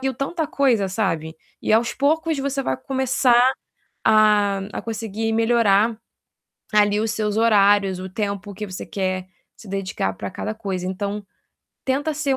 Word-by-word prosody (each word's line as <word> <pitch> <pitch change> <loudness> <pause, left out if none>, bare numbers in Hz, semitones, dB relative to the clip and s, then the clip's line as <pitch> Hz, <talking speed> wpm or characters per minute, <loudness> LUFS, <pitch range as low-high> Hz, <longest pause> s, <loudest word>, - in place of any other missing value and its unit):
viu 265 -1 -1
tanta 310 +5 -2
coisa, 250 -10 +2
sabe. 165 -6 -2 0.2
E - - 0
aos 235 +2 +3
poucos 315 +2 +1
você 275 0 -1
vai - - -1
começar 260 -2 +2 0.6
a 210 -2 +4
a - - -4
conseguir 225 0 -3
melhorar 225 -1 +3 0.8
ali 210 0 +4
os 220 0 0
seus 210 -1 -1
horários, 205 -4 +4
o 185 - -6
tempo 200 0 -4
que 210 +2 -5
você 185 -1 -7
quer 185 -1 -3 0.3
se 215 - -14
dedicar 190 - -2
para 100 +1 -6
cada 215 +1 -4
coisa. 195 -5 -4
Então 200 +2 -3 0.6
tenta 285 +4 0
ser 285 -3 0
215 Hz, 150 wpm, -22 LUFS, 195-245 Hz, 0.8 s, a